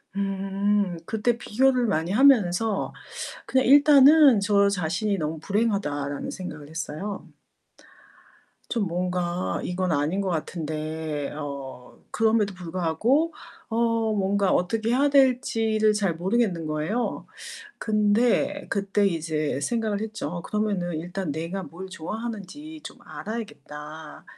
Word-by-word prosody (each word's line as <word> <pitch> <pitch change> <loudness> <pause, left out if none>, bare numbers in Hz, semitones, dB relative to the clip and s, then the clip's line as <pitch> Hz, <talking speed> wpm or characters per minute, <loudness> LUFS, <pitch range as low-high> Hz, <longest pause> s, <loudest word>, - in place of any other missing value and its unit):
음. 195 -1 0
그때 220 +2 0
비교를 250 +2 +2
많이 170 -4 0
하면서 215 -4 +3 0.5
그냥 260 -2 +2
일단은 285 -2 +7
저 200 0 +3
자신이 195 +2 -1
'너무 155 0 -3
불행하다.'라는 195 -9 -1
생각을 150 -6 -7
했어요. 165 +5 -5 1.5
좀 225 -5 +1
뭔가 180 0 -2
이건 180 0 -1
아닌 150 +7 0
것 195 - -1
같은데 155 -2 -3
어 140 -4 -7
그럼에도 220 -2 +2
불구하고 185 - 0 0.4
어 225 - -3 0.4
뭔가 200 -1 +1
어떻게 220 +5 0
해야 280 +4 +3
될지를 225 -5 +3
잘 200 -4 0
모르겠는 185 -2 0
거예요. 155 +11 -2 0.5
근데 220 +7 +1
그때 200 0 +1
이제 155 -5 -1
생각을 220 +3 -1
했죠. 220 -8 -4
'어 175 +1 -4
그러면은 200 -4 -1
일단 175 0 -4
내가 165 +6 -4
뭘 185 +3 -9
좋아하는지 225 - -6
좀 - - -9
알아야겠다. 155 -8 -8
195 Hz, 260 characters per minute, -25 LUFS, 165-225 Hz, 1.5 s, 일단은